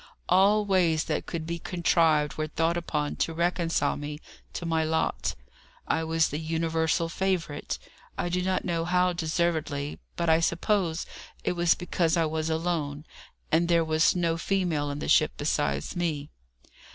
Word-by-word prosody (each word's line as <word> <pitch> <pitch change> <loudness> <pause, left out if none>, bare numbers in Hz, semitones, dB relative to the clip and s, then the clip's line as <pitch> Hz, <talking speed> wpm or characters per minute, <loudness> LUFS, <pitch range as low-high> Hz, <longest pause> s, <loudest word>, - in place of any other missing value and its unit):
All 200 +3 +4
ways 175 -5 +2
that - - -3
could 165 -2 -4
be 170 +1 -3
contrived 165 -4 +2
were 155 0 -3
thought 165 +2 0
upon 150 -4 -2
to 165 - -1
reconcile 170 0 +1
me 150 0 -5 0.4
to 175 - -5
my 165 -1 +1
lot. 155 - -1 0.5
I 160 - +1
was 160 0 +2
the 150 - -3
universal 160 +1 0
favourite. 175 -4 -2 0.4
I - - -1
do 180 +1 0
not 185 0 0
know 170 -2 0
how 180 +1 +2
deservedly, 160 -3 -1 0.2
but 170 - -1
I 160 0 +5
suppose 170 0 0 0.4
it - - +1
was 175 -1 +3
because 175 -1 0
I 165 - +3
was 155 0 -2
alone, 160 -3 -2 0.5
and 170 +2 +3
there 170 -1 +3
was 155 +2 +3
no 170 -2 +1
female 170 -5 0
in 145 - -4
the - - -4
ship - - +4
besides 70 0 -1
me. 155 -5 -2
165 Hz, 160 wpm, -27 LUFS, 155-175 Hz, 0.5 s, I